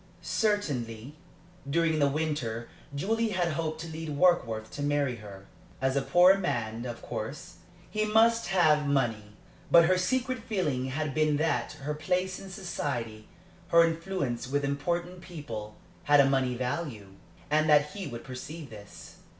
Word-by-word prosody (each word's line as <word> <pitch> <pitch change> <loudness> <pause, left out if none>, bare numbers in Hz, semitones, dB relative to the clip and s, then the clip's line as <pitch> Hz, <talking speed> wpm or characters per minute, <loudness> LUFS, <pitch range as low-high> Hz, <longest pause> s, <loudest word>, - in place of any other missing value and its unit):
Certainly, 140 - -1 0.6
during 160 +1 +2
the 145 - +4
winter, 140 -6 -2 0.3
Julie 225 +9 0
had 180 -4 0
hoped 155 0 -2
to 165 - -6
lead 160 0 -6
Warkworth 120 -11 +2
to 145 - -6
marry 145 -3 0
her. 100 -3 -11 0.3
As 135 0 0
a 140 - +2
poor 180 +7 +5
man, 115 - -2
of 120 -1 -7
course, 150 +11 -6 0.3
he 215 0 -1
must 225 +1 +4
have 155 -5 +3
money. 115 -7 0 0.4
But 170 -1 +7
her 185 +2 +3
secret 255 +6 0
feeling 180 - -1
had 145 +2 -2
been 155 -1 +2
that 145 -6 0
her 150 +2 -2
place 180 +4 -1
in 195 - -10
society, 120 - -4 0.4
her 170 0 +6
influence 165 -8 -2
with 140 +2 0
important 175 +6 -2
people, 130 -12 -7 0.3
had 145 -1 +6
a 140 - +6
money 130 -2 +1
value, 125 -5 -3 0.4
and 155 +1 +3
that 150 0 +5
he 200 -3 -6
would 120 -3 -7
perceive 135 +2 -8
this. 105 -1 -12
150 Hz, 150 wpm, -29 LUFS, 125-175 Hz, 0.6 s, But